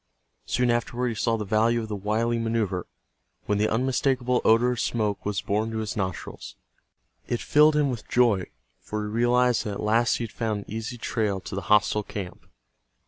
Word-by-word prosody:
Soon 125 0 +2
afterward 120 +1 -1
he - - -2
saw 115 +1 0
the 105 - -4
value 110 +3 +2
of - - -6
the 105 - -4
wily 110 +4 0
maneuver, 110 -6 -1 0.6
when 105 0 0
the 110 - +2
unmistakable 125 +1 +1
odor 115 +3 +4
of 125 - -3
smoke 105 -4 -1
was 100 -2 -2
borne 105 +2 0
to 110 - -4
his 110 -1 -3
nostrils. 95 - -5 0.7
It 120 - -1
filled 150 +1 +4
him 145 -2 +2
with 120 -4 -6
joy, 115 -7 +3 0.3
for 105 0 -4
he 105 - -4
realized 120 +1 +2
that 105 - -3
at 100 - -6
last 115 +2 +3
he - - -3
had 115 - -6
found 110 -3 -2
an - - -14
easy 115 +3 -4
trail 105 -4 -1
to - - -9
the 95 - -2
hostile 105 0 +4
camp. 100 -3 -8
110 Hz, 195 wpm, -26 LUFS, 105-120 Hz, 0.7 s, odor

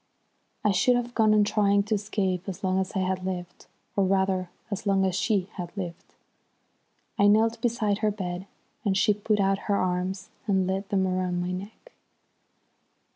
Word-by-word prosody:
I 210 - +4
should 245 +6 +3
have 245 0 -2
gone 220 -2 +4
on 210 -1 +5
trying 205 -1 +3
to 215 +2 -2
escape 200 -3 -1
as 185 - -7
long 185 0 +2
as 190 -1 -2
I 190 - +1
had 185 0 -1
lived, 180 -2 -5 0.3
or 200 - +3
rather 190 -1 +1 0.2
as 205 +1 -3
long 195 -1 +3
as 190 - 0
she 195 0 +1
had 175 -2 -5
lived. 175 -3 -6 1.0
I 200 - +6
knelt 225 +2 +3
beside 220 -4 +1
her 215 - +2
bed 185 -2 -4 0.4
and 195 -3 +1
she 210 +1 +4
put 210 +1 0
out 195 0 +2
her 200 - +4
arms 185 0 -1 0.2
and 190 -2 +2
laid 195 +2 -2
them 190 -2 +2
round 185 -1 -1
my 180 +1 -2
neck. 200 - -8
195 Hz, 180 wpm, -27 LUFS, 185-210 Hz, 1.0 s, I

